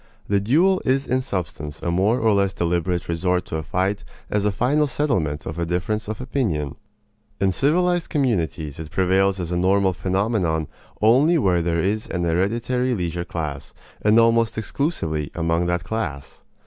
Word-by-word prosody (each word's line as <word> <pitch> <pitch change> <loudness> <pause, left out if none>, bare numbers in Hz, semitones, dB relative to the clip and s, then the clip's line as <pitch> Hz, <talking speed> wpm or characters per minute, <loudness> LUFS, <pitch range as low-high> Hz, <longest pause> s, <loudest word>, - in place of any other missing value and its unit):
The 100 0 +2
duel 165 - +3
is 135 +1 +1
in 130 +1 0
substance 80 - -4
a 85 - 0
more 100 +8 +2
or 110 -1 +3
less 100 -1 +2
deliberate 85 +1 -1
resort 90 +2 0
to 80 - -4
a - - -3
fight 95 +6 -1 0.3
as 105 -1 +1
a 105 - +3
final 135 +9 +2
settlement 90 - -1
of 80 +1 -5
a 85 - 0
difference 95 +5 -2
of 110 0 -4
opinion. 95 - -2 0.6
In 95 -1 +2
civilized 175 - +1
communities 85 - -1
it 80 -1 -6
prevails 95 +2 +2
as 85 -1 -4
a 90 - 0
normal 95 +1 +3
phenomenon 95 -3 0 0.4
only 135 +10 +5
where 90 - +2
there 85 0 0
is 105 +4 -1
an 90 -1 -2
hereditary 115 +9 0
leisure 85 -2 -3
class, 75 -6 -5 0.3
and 105 +1 +4
almost 115 -1 +3
exclusively 95 - -2
among 85 +1 0
that 85 0 0
class. 90 -9 -5
95 Hz, 165 wpm, -22 LUFS, 85-115 Hz, 0.6 s, only